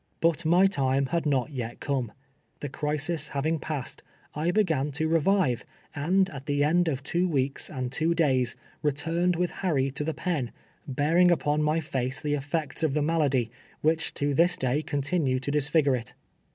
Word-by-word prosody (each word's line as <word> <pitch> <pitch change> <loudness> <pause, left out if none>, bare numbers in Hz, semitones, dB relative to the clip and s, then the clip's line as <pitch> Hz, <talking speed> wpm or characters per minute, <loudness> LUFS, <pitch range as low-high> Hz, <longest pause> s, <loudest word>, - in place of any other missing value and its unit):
But 165 0 +1
my 175 +4 +5
time 135 -7 +1
had 165 +3 -1
not 140 0 +1
yet 120 -4 -5
come. 130 -5 -2 0.5
The 145 - -4
crisis 150 +2 0
having 155 +3 -1
passed, 145 -4 -5 0.3
I 155 +3 -1
began 165 -8 +1
to 155 +3 -1
revive, 165 - +2 0.3
and 185 +6 +2
at 135 0 -9
the 145 0 +1
end 170 +4 +3
of 140 -4 -2
two 175 +5 0
weeks 135 -3 0
and 130 -3 -4
two 165 +4 +1
days, 130 -7 +2 0.3
returned 165 +4 0
with 175 +1 0
Harry 140 -8 +1
to 140 - -4
the 160 0 -2
pen, 150 -10 -2 0.4
bearing 150 +6 +3
npon 150 -4 +2
my 155 +2 +2
fiice 130 -3 -2
the 150 -1 -1
effects 145 +3 -2
of 155 -3 +1
the 150 - +2
malady, 145 -7 +1 0.3
which 160 +1 +1
to 145 0 0
this 175 +5 +3
day 130 +3 0
con 145 -2 -2
tinues 140 -5 0
to 140 - -2
disfigm'e 145 -1 +2
it. 115 - -10
150 Hz, 180 wpm, -27 LUFS, 135-165 Hz, 0.5 s, my